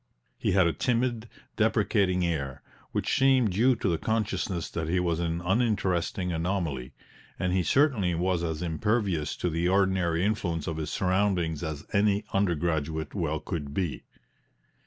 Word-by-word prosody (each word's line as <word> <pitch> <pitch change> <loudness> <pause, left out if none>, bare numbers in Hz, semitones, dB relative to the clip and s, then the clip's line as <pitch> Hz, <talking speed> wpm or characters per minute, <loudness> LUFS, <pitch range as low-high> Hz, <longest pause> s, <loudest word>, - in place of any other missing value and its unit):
He - - +1
had 95 -1 +5
a 85 - +2
timid, 120 -3 0 0.3
deprecating 90 -3 +2
air, 70 -5 -3 0.3
which - - -1
seemed 130 -5 +4
due 120 +7 +3
to 115 - -2
the 85 -4 +1
consciousness 105 -5 -1
that 80 -1 -3
he 90 +2 +2
was 85 -2 0
an 85 0 -1
uninteresting 95 -3 0
anomaly, 80 -7 -2 0.4
and 90 -1 -1
he 95 - +3
certainly 100 - +2
was 90 +1 0
as 80 0 -2
impervious 90 -2 0
to - - -2
the 85 +1 0
ordinary 95 -3 +2
influence 90 -7 -1
of 80 - -3
his 80 -1 -3
surroundings 90 -4 0
as 80 -3 -5
any 100 0 +3
undergraduate 80 -5 0
well 80 -5 -1
could 75 -4 -5
be. 90 -6 -2
90 Hz, 150 wpm, -28 LUFS, 80-100 Hz, 0.4 s, had